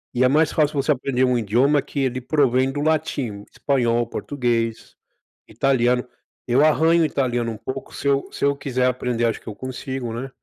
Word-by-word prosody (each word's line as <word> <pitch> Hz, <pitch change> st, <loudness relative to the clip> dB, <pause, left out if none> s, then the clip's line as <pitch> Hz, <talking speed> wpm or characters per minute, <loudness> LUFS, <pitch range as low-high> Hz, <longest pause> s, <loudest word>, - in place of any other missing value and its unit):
E 125 Hz, -, +3 dB
é -, -, +6 dB
mais 150 Hz, +3 st, +3 dB
fácil 150 Hz, -1 st, +1 dB
você 140 Hz, +2 st, +1 dB
aprender 130 Hz, -2 st, 0 dB
um 125 Hz, -1 st, +3 dB
idioma 125 Hz, +7 st, +2 dB
que 140 Hz, -, -4 dB
ele 130 Hz, -1 st, -1 dB
provém 130 Hz, -2 st, +2 dB
do 145 Hz, -, -3 dB
latim, 145 Hz, -5 st, 0 dB
o 100 Hz, -, -13 dB
espanhol, 120 Hz, -4 st, +1 dB
o -, -, -8 dB
português, 115 Hz, -4 st, -2 dB, 0.5 s
italiano. 125 Hz, -2 st, +1 dB, 0.4 s
Eu 125 Hz, +4 st, +3 dB
arranho 160 Hz, +2 st, +4 dB
italiano 120 Hz, -5 st, -1 dB
um 110 Hz, -, -7 dB
pouco, 130 Hz, -, -7 dB
se -, -, -4 dB
eu 140 Hz, 0 st, +1 dB
se -, -, -2 dB
eu 140 Hz, 0 st, +2 dB
quiser 130 Hz, -3 st, -1 dB
aprender, 125 Hz, -2 st, 0 dB
acho 115 Hz, -, -1 dB
que -, -, -25 dB
eu 105 Hz, -, -6 dB
consigo, 130 Hz, 0 st, -5 dB
né, 125 Hz, +4 st, -5 dB
130 Hz, 195 wpm, -22 LUFS, 120-140 Hz, 0.5 s, é